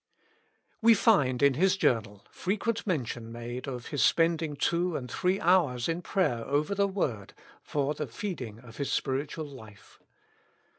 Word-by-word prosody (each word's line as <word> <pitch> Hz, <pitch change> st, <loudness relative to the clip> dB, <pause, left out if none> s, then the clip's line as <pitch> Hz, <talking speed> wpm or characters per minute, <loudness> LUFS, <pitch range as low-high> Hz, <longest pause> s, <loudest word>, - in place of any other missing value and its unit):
We 230 Hz, 0 st, +7 dB
find 140 Hz, -, +3 dB
in 140 Hz, -1 st, +6 dB
his 185 Hz, +7 st, +2 dB
journal 105 Hz, -, 0 dB
frequent 215 Hz, +4 st, -2 dB
mention 120 Hz, -, -2 dB
made 120 Hz, +3 st, -6 dB
of 125 Hz, -3 st, -6 dB
his 145 Hz, -, 0 dB
spending 165 Hz, -2 st, +2 dB
two 170 Hz, +3 st, 0 dB
and 125 Hz, -2 st, -7 dB
three 185 Hz, +8 st, +1 dB
hours 165 Hz, -9 st, +3 dB
in 165 Hz, +1 st, -1 dB
prayer 150 Hz, -11 st, 0 dB
over 145 Hz, -, 0 dB
the 200 Hz, 0 st, +2 dB
word 125 Hz, -, -3 dB, 0.3 s
for 145 Hz, 0 st, -1 dB
the 150 Hz, -1 st, -4 dB
feeding 125 Hz, -, -5 dB
of 115 Hz, -3 st, -14 dB
his 140 Hz, -, -2 dB
spiritual 145 Hz, +4 st, -2 dB
life. 110 Hz, -8 st, -14 dB
145 Hz, 150 wpm, -29 LUFS, 125-180 Hz, 0.3 s, We